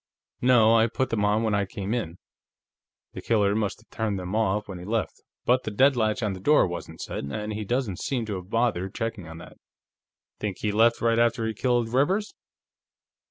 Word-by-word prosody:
"No; 115 -3 +5
I 115 0 +5
put 130 +3 -2
them 110 -3 0
on 105 +2 +2
when 110 -2 0
I 100 -1 +1
came 100 0 -4
in. 90 -8 -3 1.0
The - - -7
killer 105 -3 +2
must 105 -2 -2
have - - -27
turned 110 -3 -2
them 90 +2 -4
off 105 -1 0
when 95 -3 -7
he - - -9
left, 110 +3 -2 0.2
but 125 +1 +3
the - - -4
deadlatch 120 0 +2
on 105 -2 0
the 95 - -7
door 150 +10 +4
wasn't 90 -1 -6
set, - - -5
and 105 +10 -4
he 105 +1 -4
doesn't 120 -3 -2
seem 125 -4 -2
to 105 -3 -3
have 90 0 -10
bothered 105 -5 0
checking 115 -6 -4
on 80 0 -9
that." - - -12 0.8
"Think 100 -3 -3
he 105 - 0
left 115 +3 +3
right 115 0 +2
after 115 -1 +2
he 110 - -2
killed 120 0 0
Rivers?" 185 +11 +1
110 Hz, 205 wpm, -26 LUFS, 100-120 Hz, 1.0 s, No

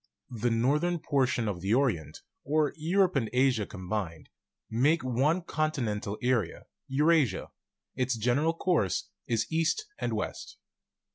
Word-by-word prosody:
The 120 0 0
northern 145 +10 +2
portion 130 -6 0
of 95 -4 -3
the 100 +5 +2
Orient, 115 - 0 0.2
or 150 0 +1
Europe 180 +4 +2
and 115 -6 +1
Asia 125 -4 +2
com 95 -3 -9
bined, 90 -6 -3 0.4
makes 140 +8 +2
one 135 +8 +1
continental 120 - -2
area, 120 -8 0 0.2
Eurasia; 145 - +2 0.4
its 130 -1 0
general 125 +9 +2
course 165 - 0 0.2
is 115 -2 +1
east 165 - +1
and - - -1
west. - - -4
130 Hz, 130 wpm, -29 LUFS, 110-155 Hz, 0.4 s, northern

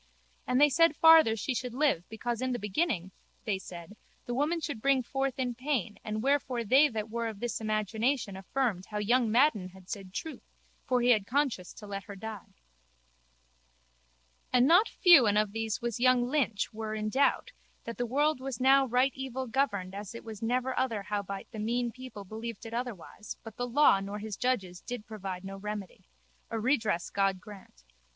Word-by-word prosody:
And 250 +1 +2
they 295 - +7
said 330 +2 +4
farther 320 -8 +7
she 225 +4 -2
should 250 -1 -4
live 270 - +1
because 235 +2 -3
in 255 0 0
the - - -1
beginning, 210 - -1 0.3
they 205 -4 -1
said, 175 +1 -10 0.3
the 245 - -3
woman 300 +7 0
should 290 -8 -5
bring 275 0 +3
forth 270 +1 -2
in 250 -2 -1
pain 250 -5 -2
and 215 +1 -3
wherefore 265 -3 +1
they 270 +7 +5
that 220 -1 -4
were 235 0 -2
of 215 -3 -6
this 240 0 -3
imagination 215 +1 -1
affirmed 195 -1 -2
how 210 - -5
young 230 +3 +2
Madden 230 -7 +3
had 185 0 -14
said 195 -3 -6
truth 310 +11 -6 0.5
for 250 -1 +2
he 245 - +2
had 210 -4 +2
conscience 260 -9 0
to 210 - -11
let 200 -1 -6
her 200 - -9
die. 215 0 -8 2.0
And 250 +1 +4
not 355 +8 +5
few 340 - +6
and 205 0 +3
of 210 -1 +2
these 225 +1 -3
was 235 -1 -2
young 255 0 +4
Lynch 250 -8 0
were 215 0 -4
in 215 0 -2
doubt 280 - +1 0.3
that 230 0 -7
the 245 - 0
world 290 +3 +1
was 260 -3 -5
now 270 +1 +5
right 255 +3 +2
evil 265 -1 -4
governed 220 -7 -1
as 205 +2 -7
it 230 - -8
was 220 -1 -9
never 250 +3 0
other 225 -6 -1
howbeit 200 -1 -4
the 220 - -7
mean 235 +2 -1
people 250 -4 -9
believed 220 +3 -7
it 225 - -8
otherwise 230 -4 -6
but 220 -2 -10
the 245 - -3
law 265 -5 +5
nor 200 +1 -5
his 210 -1 -5
judges 195 -9 -1
did 240 -3 -6
provide 195 -4 -6
no 195 0 -6
remedy. 210 -1 -7 0.4
A 225 - -3
redress 220 -7 0
God 195 -1 +1
grant. 190 - -14
230 Hz, 190 wpm, -30 LUFS, 205-260 Hz, 2.0 s, they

